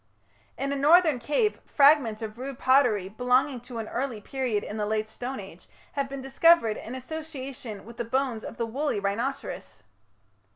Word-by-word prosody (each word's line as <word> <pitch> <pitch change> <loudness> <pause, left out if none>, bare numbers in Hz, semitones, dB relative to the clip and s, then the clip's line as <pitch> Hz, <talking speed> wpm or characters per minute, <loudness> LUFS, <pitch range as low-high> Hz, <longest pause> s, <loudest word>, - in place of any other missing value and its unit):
In 275 +1 -2
a - - -1
northern 305 0 +5
cave 300 - 0
fragments 275 -7 +4
of 220 +1 -6
rude 270 0 -5
pottery, 250 -9 +3
belonging 250 +5 +1
to 245 -1 -9
an 225 -1 -4
early 245 -2 -3
period 240 -2 -2
in 210 - -6
the 210 - -1
Late 215 0 0
Stone 250 +4 -6
Age, 190 -3 -11 0.2
have 280 -1 -2
been 275 -1 -6
discovered 270 -4 +4
in 235 +4 -7
association 260 -6 -7
with 235 +1 -12
the - - -1
bones 250 -1 -1
of - - -8
the 230 - -1
woolly 270 +1 -1
rhinoceros. 225 +7 -4
255 Hz, 170 wpm, -27 LUFS, 220-275 Hz, 0.2 s, northern